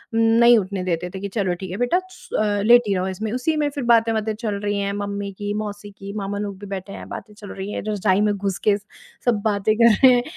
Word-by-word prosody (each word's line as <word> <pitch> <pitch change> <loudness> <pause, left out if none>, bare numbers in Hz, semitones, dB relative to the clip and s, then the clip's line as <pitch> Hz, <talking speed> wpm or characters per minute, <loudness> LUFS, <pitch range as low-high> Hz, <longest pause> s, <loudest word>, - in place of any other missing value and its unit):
नहीं 230 +1 +6
उठने 190 -1 -4
देते 180 -1 -2
थे - - -4
कि 200 - -3
"चलो, 190 -3 -1
ठीक 185 0 -7
है 185 - -4
बेटा, 245 - +2
स - - -15
अ, 205 -1 +1
लेटी 230 -2 +5
रहो 185 0 -1
इसमें।" 210 +3 -4
उसी 255 +6 0
में 295 -1 +1
फिर 285 -1 -5
बातें-वातें 225 -1 +2
चल 215 -2 -3
रही 205 0 0
हैं, 200 0 -1
मम्मी 200 0 -4
की, 205 0 -2
मौसी 205 0 -7
की, 200 0 -9
मामा 200 0 -3
लोग 200 -2 -4
भी 205 - -9
बैठे 190 +1 -7
हैं, - - -9
बातें 215 - -8
चल 205 -1 -11
रही 195 +1 -6
हैं, - - -3
रज़ाई 205 -1 +2
मैं 205 - 0
घुस 195 -2 -2
के 205 -1 +5
स 205 - -19 0.4
सब 230 -4 +2
बातें 210 0 +2
कर 230 -1 +6
रहे 260 -1 +9
हैं, 245 - +1
205 Hz, 255 wpm, -22 LUFS, 200-225 Hz, 0.4 s, रहे